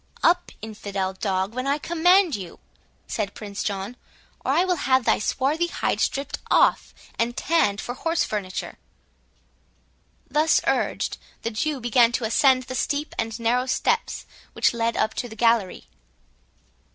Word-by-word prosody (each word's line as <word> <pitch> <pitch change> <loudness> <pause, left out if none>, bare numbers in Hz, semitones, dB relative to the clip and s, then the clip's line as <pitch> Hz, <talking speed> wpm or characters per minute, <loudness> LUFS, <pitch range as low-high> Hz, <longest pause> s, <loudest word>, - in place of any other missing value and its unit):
"Up, 355 +1 +3
infidel 200 -3 -4
dog 190 +1 -1
when 255 +2 -3
I 280 +1 +2
command 345 +2 +3
you," 185 -4 -8 0.5
said 205 -3 -3
Prince 205 -2 -6
John, 200 +3 -3 0.5
"or - - 0
I 360 - +3
will 360 -2 +1
have 260 -3 +2
thy - - +3
swarthy 285 +10 0
hide - - -1
stript 285 +2 -1
off, - - +3 0.3
and 240 +2 0
tanned 260 -12 +2
for 245 - -4
horse 330 +6 0
furniture." 190 -4 -4 1.5
Thus 310 +1 +3
urged, - - 0 0.2
the 230 - -2
Jew 280 +6 -1
began 240 0 +4
to 245 - -1
ascend 255 +3 +3
the 255 - -7
steep 285 +3 -2
and 225 +1 -2
narrow 245 +3 +1
steps 460 - 0 0.3
which - - +2
led 230 0 -1
up 220 - +1
to 245 - -4
the 220 - -10
gallery. 230 -4 +1
245 Hz, 150 wpm, -24 LUFS, 215-295 Hz, 1.5 s, began